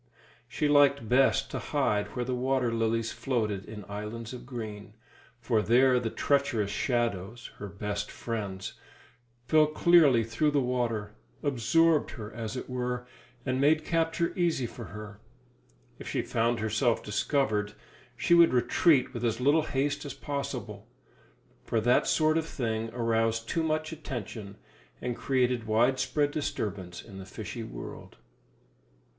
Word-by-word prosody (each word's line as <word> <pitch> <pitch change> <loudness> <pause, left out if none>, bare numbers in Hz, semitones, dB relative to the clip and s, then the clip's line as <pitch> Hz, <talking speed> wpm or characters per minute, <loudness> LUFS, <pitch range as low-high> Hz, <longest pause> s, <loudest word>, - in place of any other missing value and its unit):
She 150 - -1
liked 140 -4 +4
best 135 +2 +3
to - - -3
hide 105 -8 -1
where 125 - -1
the 130 - -2
water 125 -1 0
lilies 115 0 0
floated 110 -7 -2
in 105 -2 -9
islands 105 +3 -6
of 125 -1 -9
green, 110 -4 -7 0.4
for 115 -2 +1
there 125 +3 +4
the 120 -2 -2
treacherous 130 -7 +1
shadows 120 -2 -2
her 100 - -5
best 105 +1 -4
friends 100 -5 -5 0.7
fell 155 -1 +5
clearly 155 -6 +5
through 115 +7 +1
the 145 -1 +2
water; 120 -5 -1 0.3
absorbed 155 +4 +3
her, 105 -1 -7
as 115 0 -5
it - - -5
were, 125 -1 -3 0.4
and 130 0 0
made 155 +2 +3
capture 165 0 0
easy 170 -8 +1
for 120 0 -8
her. 105 +2 -9 0.8
If - - -9
she - - -1
found 115 0 0
herself 110 +2 +1
discovered, 105 -1 0 0.4
she 170 - +2
would 170 -5 +7
retreat 130 +2 +3
with 120 -1 -5
as 115 -1 0
little 145 +5 +4
haste 145 -1 -1
as 145 - -6
possible; 120 -7 -5 0.8
for 115 - 0
that 120 +3 +3
sort 155 0 +3
of 160 - -4
thing 115 -6 -2
aroused 115 -1 0
too 165 - 0
much 155 0 -1
attention, 115 -9 -6 0.4
and 125 -1 -3
created 125 -3 0
widespread 130 +6 +2
disturbance 100 - -4
in 100 -4 -11
the 95 - -8
fishy - - -6
world. - - -9
120 Hz, 140 wpm, -29 LUFS, 110-140 Hz, 0.8 s, would